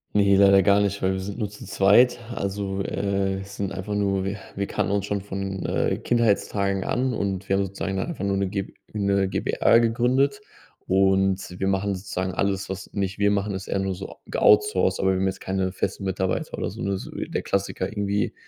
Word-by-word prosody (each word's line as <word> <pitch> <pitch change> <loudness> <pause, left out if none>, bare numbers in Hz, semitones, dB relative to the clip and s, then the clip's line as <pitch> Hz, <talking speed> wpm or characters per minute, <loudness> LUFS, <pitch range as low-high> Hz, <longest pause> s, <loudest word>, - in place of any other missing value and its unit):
Ne, 100 -1 +5
leider 100 0 +6
gar 100 +2 +4
nicht, 100 0 -1
weil 95 0 +2
wir 95 - -2
sind 100 +3 -6
nur 105 -2 -1
zu 105 - -11
zweit. 105 +7 +4 0.2
Also, 100 0 -2
äh, 95 -1 -1
sind 100 -1 -4
einfach 95 +2 -4
nur 95 -2 0
wir 100 +1 -2 0.2
wir 100 - -1
kannten - - -1
uns 100 -1 0
schon 100 -1 -2
von, 95 -1 -4
äh, - - 0
Kindheitstagen 100 -4 +1
an 125 +1 0
und 95 -2 -2
wir 95 - +2
haben 100 - +2
sozusagen 95 0 -4
einfach 130 - -3
nur 100 0 +1
'ne 95 -1 0
Gb 100 0 -4 0.2
'ne 100 -2 +1
GbR 115 - +3
gegründet. 125 +4 +2 0.4
Und 95 -1 +2
wir 95 - +1
machen 95 0 0
sozusagen 95 -1 -3
alles, 100 0 -1
was 95 0 -6
nicht 95 -1 -3
wir 100 0 +3
machen, 100 0 0
ist 95 - -6
eher 100 - 0
nur 95 -1 -1 0.3
ge - - -3
outsourced, 105 -3 +4
aber 95 0 +3
wir - - 0
haben 95 - +1
jetzt 95 - -3
keine 95 -1 -1
festen 100 - -3
Mitarbeiter 95 -1 -2
oder - - -2
so. - - -8
Ne, 100 0 -1
so - - -8
der - - -3
Klassiker 95 -1 -1
irgendwie 100 -1 -1
100 Hz, 205 wpm, -24 LUFS, 95-100 Hz, 0.4 s, leider